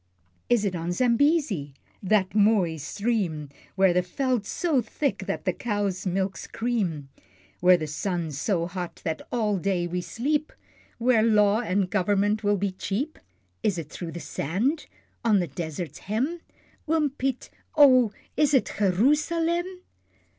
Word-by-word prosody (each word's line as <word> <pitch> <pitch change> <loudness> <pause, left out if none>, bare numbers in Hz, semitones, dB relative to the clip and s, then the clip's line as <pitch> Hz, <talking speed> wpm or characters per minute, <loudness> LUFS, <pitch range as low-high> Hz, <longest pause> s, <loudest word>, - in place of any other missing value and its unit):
Is 235 -4 +3
it 190 -2 -1
on 170 +1 -3
Zambesi, 240 - +1 0.3
that 195 -1 +2
mooi 200 -6 +3
stream, 175 - -2 0.3
Where 190 -2 +4
the 180 - +3
veld's 245 +3 -1
so 320 -8 +1
thick 275 +5 -2
that - - -3
the - - +1
cows' 205 -5 -2
milk's 190 +1 -2
cream, 195 - -2 0.5
Where 180 0 +6
the 155 - -3
sun's 160 -1 -3
so 175 -6 +1
hot 180 0 -6
that 160 -1 -2
all 215 -5 0
day 180 -1 0
we 180 +1 -2
sleep 295 - -1 0.5
Where 235 -1 +3
Law 210 -1 +4
and 195 -4 0
Government 205 +2 +1
will 205 0 +2
be 195 0 -1
cheap? 210 +11 -3 0.4
Is 210 -5 +1
it 155 -3 -6
through 170 -2 -6
the 170 - -5
sand? 195 - -2 0.4
on 220 -3 +4
the 180 - +1
desert's 160 +2 -6
hem? 260 - -2 0.5
Oom 310 -3 +2
Piet 265 -2 -3 0.2
oh! 255 -7 +6 0.2
is 295 -2 +3
it 260 - +2
Gee 210 - +3
roo 200 +10 +4
salem? 340 +4 -1
205 Hz, 150 wpm, -26 LUFS, 180-250 Hz, 0.5 s, Where